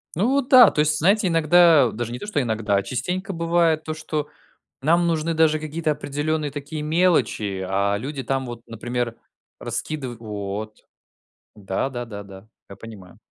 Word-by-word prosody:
Ну, 195 +8 +1
вот 275 -1 0
да, 250 -4 +9
то - - -4
есть, 150 0 +2
знаете, 195 +5 +3
иногда 165 -4 +5
даже 120 +1 -5
не 120 - -4
то - - -7
что 210 -9 -1
иногда, 110 -4 -1
а, 100 - 0
частенько, 180 - -3
бывает 165 -2 +1
то, 155 - -4
что 155 -1 -4 0.6
нам 170 +4 +3
нужны 165 0 0
даже 155 -1 +3
какие-то 155 +1 -2
определенные 150 +1 -2
такие 150 +2 -6
мелочи, 150 - +1
а 100 +2 0
люди 135 +4 -5
там 135 +2 -2
вот, 120 -1 -7
например, 120 0 -4 0.4
раскидыв 130 -7 -5
Вот. 105 -1 -6 0.7
Да 100 +4 -3
да 120 -2 -5
да 105 -3 -8
да, 95 +1 -13 0.2
я 100 - -10
понимаю. 100 -3 -12
145 Hz, 165 wpm, -23 LUFS, 115-165 Hz, 0.7 s, да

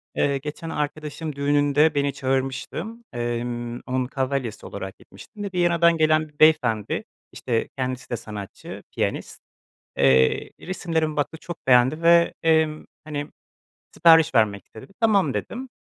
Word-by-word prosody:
Eee, 140 -1 +1
geçen 150 +4 -7
arkadaşımın 150 0 -4
düğününde 145 +2 +2
beni 140 -1 +1
çağırmıştı, 135 +5 -2 0.3
emm, 120 0 -3
onun 130 0 0
kavalyesi 130 -4 -3
olarak 95 -1 -7
gitmiştim 205 - -12
ve 200 - -3
Viyana'dan 170 -1 +3
gelen 155 0 +2
bir 145 - -30
beyefendi, 125 -10 +3 0.3
işte, 115 -3 -2
kendisi 130 -1 -3
de 120 - -2
sanatçı, 105 -3 -9
piyanist. - - -3 0.6
Eee, 65 -1 +3
resimlerimi 165 -4 -2
baktı, 150 +2 -2
çok 175 -5 -9
beğendi 130 +5 +4
ve, 170 0 +5
emm, 160 -1 +2 0.2
hani, 145 -1 -4 0.6
sipariş 160 -4 +5
vermek 105 -3 +2
istedi. 110 - -13
"Tamam." 210 -4 +3
dedim. 255 +2 -5
145 Hz, 130 wpm, -24 LUFS, 120-160 Hz, 0.6 s, ve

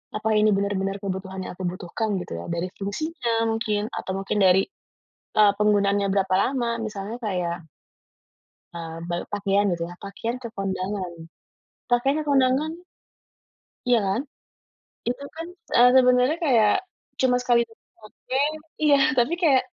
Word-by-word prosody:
apa 215 +1 -1
ini 215 - +4
benar-benar 195 0 -1
kebutuhan 190 0 -4
yang - - -6
aku 185 - -7
butuhkan 185 +4 -3
gitu 175 - -6
ya - - -7
dari 170 +2 -1
fungsinya 230 - -1
mungkin 215 -2 -1
atau - - -4
mungkin 195 +2 -2
dari, 190 0 +6 0.8
eee, 210 -1 +7
penggunaannya 200 -1 +3
berapa 190 -2 +2
lama 245 +3 +1
misalnya 210 0 -5
kayak 175 -5 -3 1.1
Eee, 165 -1 -6
ba 175 - 0 0.2
pakaian 200 0 +2
gitu 170 -1 -2
ya - - -8
pakaian 225 +5 -4
ke - - -3
kondangan 190 -1 -3 0.8
pakaian 245 +4 +2
ke - - -2
kondangan. 270 +2 +3 1.2
Ya 245 - +6
kan, 195 +5 0 0.8
itu 245 +3 -3
kan, 330 +1 -6 0.3
eee, 245 +1 +8
sebenarnya 250 +4 +4
kayak 235 - +4 0.4
cuma 255 -1 +3
sekali 235 -1 +3 0.4
pakai 265 +5 -2 0.4
iya 290 -2 +6 0.2
tapi 250 +5 +2
kayak 275 -7 +4
210 Hz, 135 wpm, -24 LUFS, 195-250 Hz, 1.2 s, eee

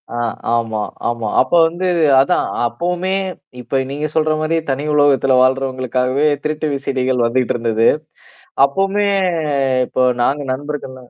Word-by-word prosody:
ஆ. - - -7 0.4
ஆமா, 115 -2 -1 0.3
ஆமா. 115 -2 -3
அப்ப 130 - -2 0.2
வந்து 175 +3 -4 0.4
அதான் 135 - +1 0.2
அப்பவுமே 175 - -2 0.5
இப்ப 130 +3 -1
நீங்க 145 +2 -3
சொல்ற 155 0 +2
மாரி 155 +1 0
தனி 135 +1 -1
உலகத்துல 135 -3 +3
வாழ்றவங்களுக்காகவே 130 +1 0 0.2
திருட்டு 155 0 -2
விசடிகள் 130 -2 -1
வந்துட்டு 125 +1 0
இருந்தது. 115 -1 +1 0.8
அப்பவுமே 195 +7 0 0.8
இப்போ - - -2 0.2
நாங்க 140 +4 0
நண்பர்கள்லாம் 130 -2 -7
135 Hz, 120 wpm, -17 LUFS, 125-150 Hz, 0.8 s, உலகத்துல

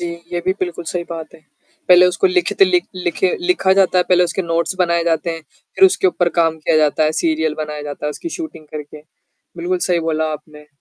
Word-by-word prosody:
जी, 175 - -3 0.3
ये 175 - -1
भी 185 - +2
बिल्कुल 175 -2 -4
सही 175 -1 -3
बात 165 -2 -7
है, - - -15 0.5
पहले 180 0 +7
उसको 180 - +1
लिखित 370 +1 +1
लिख 360 -2 +3
लिखे 180 +1 0
लिखा 350 - +2
जाता 185 -1 +3
है, 180 - +3
पहले 180 -1 +4
उसके 175 +3 -2
नोट्स 170 +2 -1
बनाए 170 -2 +2
जाते 170 0 0
हैं, 165 -1 -6 0.3
फिर 385 - +5
उसके 380 - +4
ऊपर 175 -1 +1
काम 165 -1 +2
किया 155 - +1
जाता 155 0 +2
है, 155 - +1
सीरियल 160 -1 0
बनाया 150 -1 -5
जाता 145 0 -6
है, - - -1
उसकी 335 - -6
शूटिंग 315 - -8
करके। 150 0 -9 0.6
बिल्कुल 180 +2 -1
सही 175 -1 0
बोला 160 -1 -1
आपने, 150 0 -11
170 Hz, 215 wpm, -18 LUFS, 155-185 Hz, 0.6 s, पहले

